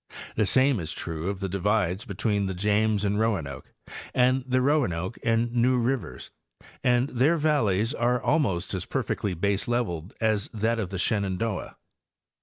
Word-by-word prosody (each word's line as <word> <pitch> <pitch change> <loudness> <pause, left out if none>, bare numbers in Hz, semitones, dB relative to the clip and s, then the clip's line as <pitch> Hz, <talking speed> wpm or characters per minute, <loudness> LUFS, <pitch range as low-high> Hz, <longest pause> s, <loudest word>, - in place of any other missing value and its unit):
The 105 -2 +2
same' 130 +2 +4
is 80 -2 -4
true 80 +1 -4
of 100 -1 -4
the 100 - -1
divides 100 0 0
between 100 -1 -1
the 95 - -3
James 105 +2 +1
and 100 +1 0
Roanoke 85 - -2 0.4
and 130 +1 +3
the 130 0 +2
Roanoke 120 - 0
and 115 +1 +1
New 125 +1 +3
rivers, 120 - -2 0.5
and 125 +1 +3
their 145 +7 +2
valleys 120 - +1
are 125 -2 +1
almost 110 - 0
as 95 - -3
perfectly 100 -3 -2
baseleveled 100 -1 -1
as 110 -2 0
that 115 +2 0
of 100 -5 -2
the 95 - -4
Shenandoah. 100 - -1
105 Hz, 150 wpm, -26 LUFS, 95-125 Hz, 0.5 s, same